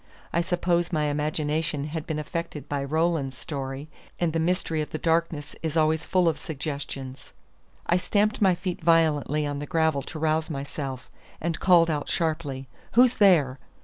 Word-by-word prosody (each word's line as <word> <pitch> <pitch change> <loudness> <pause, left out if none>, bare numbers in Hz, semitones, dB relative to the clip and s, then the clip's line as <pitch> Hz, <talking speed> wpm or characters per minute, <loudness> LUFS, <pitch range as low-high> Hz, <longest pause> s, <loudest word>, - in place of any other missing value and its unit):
I 170 - +3
suppose 175 0 0
my 155 -3 +1
imagination 150 +1 -1
had 155 +1 -5
been 155 - -2
affected 155 0 -4
by 140 -1 -2
Roland's 155 -2 0
story; 135 -1 -5 0.3
and 170 -3 +1
the 165 - +1
mystery 165 -2 0
of 150 - -4
the - - -4
darkness 165 -2 0
is 160 0 -2
always 160 0 +2
full 185 -2 +3
of 155 -2 +1
suggestions. 140 -3 -6 0.5
I 175 - +3
stamped 210 +4 +1
my 190 -3 +5
feet 180 0 -4
violently 155 -2 +3
on 145 -1 -3
the 145 - -5
gravel 160 -5 +2
to 155 - -8
rouse 155 +1 +1
myself, 140 -3 -5 0.3
and 165 0 -2
called 170 -3 +5
out 145 -2 -2
sharply, 155 -5 -1 0.3
"Who's 245 +1 +6
there?" 155 - +4
155 Hz, 165 wpm, -26 LUFS, 145-170 Hz, 0.5 s, Who's